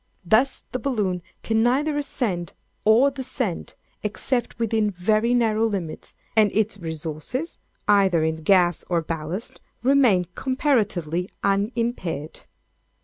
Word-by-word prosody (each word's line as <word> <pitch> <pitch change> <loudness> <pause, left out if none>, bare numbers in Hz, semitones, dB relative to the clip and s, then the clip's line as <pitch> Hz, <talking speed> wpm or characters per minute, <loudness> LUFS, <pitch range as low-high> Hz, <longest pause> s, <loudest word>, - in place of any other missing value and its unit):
Thus, 220 +9 +2
the 255 - -2
balloon 210 -9 -1 0.2
can 225 0 +1
neither 280 +6 +2
ascend 225 - -2 0.3
or 235 +6 +5
descend, 255 -8 -4 0.3
except 240 +4 -2
within 225 -2 +1
very 215 +6 +1
narrow 225 -2 +2
limits, 185 -7 -5 0.2
and 215 -2 +5
its 215 -1 0
resources, 160 - -4 0.3
either 195 -5 +4
in 160 0 0
gas 175 0 +3
or 170 -2 +1
ballast, 165 +6 -5 0.2
remain 250 -9 +4
comparatively 205 - 0
unimpaired. 200 - -1
210 Hz, 110 wpm, -24 LUFS, 175-245 Hz, 0.3 s, or